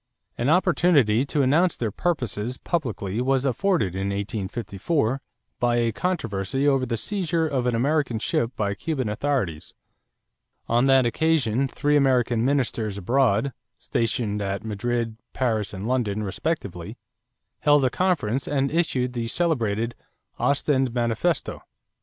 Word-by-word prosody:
An 120 +4 0
opportunity 150 - +3
to 145 0 +1
announce 160 +7 +3
their 115 -3 -2
purposes 125 - -2
publicly 115 - -2
was 135 +1 +1
afforded 135 - +1
in 95 +1 -2
1854 110 - -2 0.4
by 120 -1 +2
a 120 -1 +2
controversy 135 - -1
over 135 -2 +2
the 115 -1 -1
seizure 170 - -1
of 130 -4 -1
an 120 - +1
American 140 -1 +1
ship 115 +1 0
by 100 -2 -1
Cuban 135 +2 -2
authorities. 105 - -2 0.9
On 120 +3 +3
that 135 -2 +5
occasion 135 -2 +1
three 145 +3 0
American 125 -5 +3
ministers 120 -6 0
abroad, 120 +3 +1 0.2
stationed 110 -3 -1
at 100 +1 -3
Madrid, 115 +1 -2 0.2
Paris, 110 -5 0
and 100 +2 -5
London 110 -5 0
respectively, 100 - -4 0.6
held 145 -2 +4
a 125 - +1
conference 140 - 0
and 140 -1 0
issued 130 -7 0
the 120 -2 -2
celebrated 115 -7 0 0.5
"Ostend 135 -3 +1
Manifesto." 120 +7 0
125 Hz, 130 wpm, -24 LUFS, 110-145 Hz, 0.9 s, that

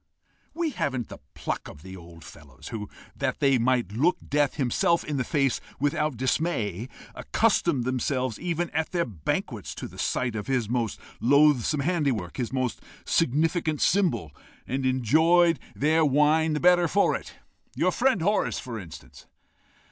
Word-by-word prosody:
We 335 -2 -1
haven't 130 - -2
the - - -10 0.2
pluck - - -4
of 75 - -12
the 95 0 -9
old 85 -2 -13
fellows, 70 -5 -13
who, 105 -3 -6 0.3
that - - -2
they 135 -3 +3
might 120 -4 +1
look 145 - +2
death 145 0 +1
himself 170 +6 +1
in 150 -2 -3
the 130 - 0
face 140 -2 0 0.2
without 150 -1 0
dismay, 125 - -1 0.2
accustomed 120 - +1
themselves, 130 -1 -1
even 175 -1 -2
at 160 +3 -2
their 170 -1 +1
banquets, 90 -11 -4
to - - -6
the - - -13
sight 120 -3 -1
of 105 - -4
his 125 -5 0
most 115 -1 -2 0.2
loathsome 140 +1 +3
handiwork, 140 - -1
his 120 -2 -2
most 130 -4 -2 0.2
significant 155 +1 +1
symbol 175 - +1 0.3
and 130 +1 -1
enjoyed 160 +6 +3 0.2
their 155 +3 +2
wine 150 +2 +3
the 150 - 0
better 175 0 +5
for 200 +5 +2
it! - - -8 0.4
your - - +2
friend 255 -9 +1
Horace, 205 +3 +1
for 120 -4 -6
instance." 85 -5 -12
135 Hz, 155 wpm, -26 LUFS, 120-160 Hz, 0.4 s, better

